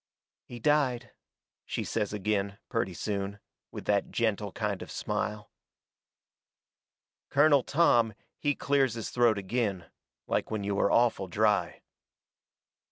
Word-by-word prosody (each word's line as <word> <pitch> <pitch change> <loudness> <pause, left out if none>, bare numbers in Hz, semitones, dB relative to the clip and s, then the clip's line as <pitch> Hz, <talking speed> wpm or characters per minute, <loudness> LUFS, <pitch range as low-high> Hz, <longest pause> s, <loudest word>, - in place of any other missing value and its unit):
"He 120 - -9
died," 130 -3 +1 0.5
she - - -3
says 105 -3 -2
agin, 100 -1 -1
purty 115 -7 -1
soon, 100 +1 -3 0.3
with - - -8
that 100 -1 +1
gentle 105 -3 -1
kind 105 -4 -2
of - - -8
smile. 105 0 -3 1.8
Colonel 145 0 +5
Tom, 120 -8 +3 0.2
he 145 -1 +1
clears 135 -4 +1
his 115 - -5
throat 120 -3 +3
agin. 100 -3 -1 0.4
Like - - -1
when 110 -2 -2
you 100 0 -1
are - - +3
awful 115 -5 +3
dry. 105 -1 +1
110 Hz, 120 wpm, -29 LUFS, 100-120 Hz, 1.8 s, Colonel